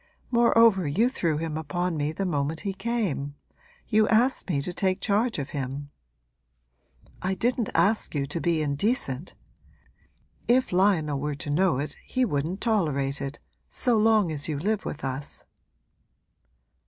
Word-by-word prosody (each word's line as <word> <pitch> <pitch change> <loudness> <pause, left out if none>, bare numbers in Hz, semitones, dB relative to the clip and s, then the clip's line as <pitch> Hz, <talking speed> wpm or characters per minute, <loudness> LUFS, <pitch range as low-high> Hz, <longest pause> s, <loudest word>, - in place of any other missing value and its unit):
Moreover 230 -6 +5
you 215 - +2
threw 165 - -1
him 160 -1 -3
upon 175 +3 -2
me 150 0 -1
the 195 +5 -3
moment 155 -2 -1
he 200 -2 -2
came 195 - -2 0.5
you 215 -1 +3
asked 240 0 +2
me 150 -6 +1
to 180 - -4
take 185 +1 0
charge 220 +3 +1
of 140 -2 -4
him.' 140 +1 -4 1.3
'I 190 +1 -1
didn't 235 +3 0
ask 210 -5 +2
you 140 -1 0
to 155 +4 -4
be 165 -3 +1
indecent! 145 - -1 1.1
If 250 -4 +3
Lionel 175 -7 +2
were 150 +1 -2
to 145 +1 -5
know 170 -2 +2
it 145 +3 -4
he 255 0 0
wouldn't 160 +1 -2
tolerate 145 - 0
it, 140 +1 -4 0.3
so 245 -2 +1
long 215 -5 +4
as 145 -2 -3
you 155 -3 -2
live 205 +7 -1
with 155 - -5
us.' 135 +2 -4
175 Hz, 150 wpm, -26 LUFS, 145-215 Hz, 1.3 s, Moreover